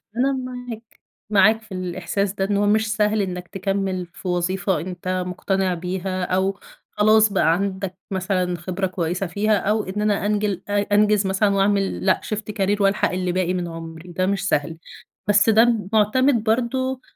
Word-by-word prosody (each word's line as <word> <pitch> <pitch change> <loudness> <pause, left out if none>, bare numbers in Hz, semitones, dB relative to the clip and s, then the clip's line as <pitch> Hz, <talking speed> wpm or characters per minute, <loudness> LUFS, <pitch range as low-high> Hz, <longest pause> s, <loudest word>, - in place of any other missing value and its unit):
أنا 265 +3 +2
معاك، 245 -3 -7 0.3
معاك 215 +2 +4
في 215 -2 -20
الإحساس 185 +2 -2
ده 195 - -1
إن 200 0 0
هو 205 - +2
مش 215 +1 +2
سهل 210 -1 +2
إنك 180 -2 -4
تكمل 195 -1 -2
في 175 +2 -11
وظيفة 185 +2 0
أنت 185 +1 -3
مقتنع 190 +1 -1
بيها 185 +1 -3
أو 190 +2 0 0.4
خلاص 215 +1 +5
بقى 165 -3 +3
عندك 190 0 -2 0.2
مثلًا 185 -1 -1
خبرة 185 +3 -3
كويسة 180 +1 -2
فيها، 210 +4 +1
أو 210 +2 0
إن 190 +3 -4
أنا 205 -1 +1
أنجل 205 -3 0
أ 205 0 +2 0.2
أنجز 210 -1 +3
مثلًا 195 +2 +2
وأعمل 195 0 +1
لأ، 185 - +3
shift 215 0 -4
career 200 0 0
وألحق 195 0 +2
اللي 180 -1 -1
باقي 185 0 0
من 180 -1 -2
عمري، 165 +1 -9
وده 185 +2 -1
مش 195 0 -1
سهل. 150 +3 0 0.5
بس 210 +2 +4
ده 230 +2 +5 0.2
معتمد 230 +3 +3
برضو 255 +3 0
195 Hz, 170 wpm, -22 LUFS, 185-210 Hz, 0.5 s, خلاص